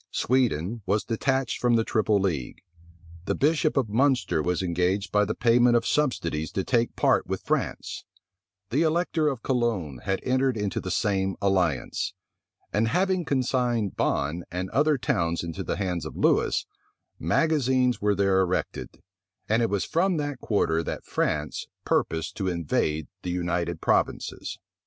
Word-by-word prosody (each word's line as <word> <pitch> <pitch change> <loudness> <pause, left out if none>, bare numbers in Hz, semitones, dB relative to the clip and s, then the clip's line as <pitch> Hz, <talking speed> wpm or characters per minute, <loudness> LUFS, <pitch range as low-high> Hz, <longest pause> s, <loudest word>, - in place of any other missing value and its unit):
Sweden 115 - 0
was 105 +2 +1
detached 130 +2 -1
from 120 -1 +3
the 115 - +3
triple 110 -2 +1
league; 85 -10 -2 0.6
the - - 0
bishop 155 +1 +2
of 130 -4 +2
Munster 125 - +2
was 90 +3 -1
engaged 90 +3 0
by 105 0 +3
the 110 - -3
payment 120 0 +4
of 115 -1 +2
subsidies 85 - 0
to 95 - -1
take 120 +1 +1
part - - +2
with - - -3
France; - - -2 0.7
the 140 +6 +2
elector 165 -1 +1
of 135 -5 -2
Cologne 110 - -1
had 95 +8 -1
entered 130 -1 +1
into 105 -4 -2
the - - -5
same 95 -2 0
alliance; 90 -9 0 0.6
and 110 +2 +2
having 185 +6 +1
consigned 125 -6 0
Bonne 75 +5 0
and 90 +2 -4
other 145 +4 +3
towns 90 -11 0
into 85 -1 -5
the - - -2
hands 90 -4 -2
of 80 - -7
Lewis, - - +2 0.5
magazines 130 - +2
were 105 0 +2
there 95 -1 +3
erected; 90 -1 -2 0.4
and 110 +2 +2
it 115 - +2
was 100 -1 0
from 180 +2 +1
that 145 -3 -3
quarter 80 -8 +1
that 85 - -5
France 75 0 -2 0.2
purposed 80 0 0
to 95 - -1
invade 80 -3 -1
the 90 - -5
United 85 -1 -2
Provinces. - - -1
105 Hz, 150 wpm, -26 LUFS, 90-130 Hz, 0.7 s, payment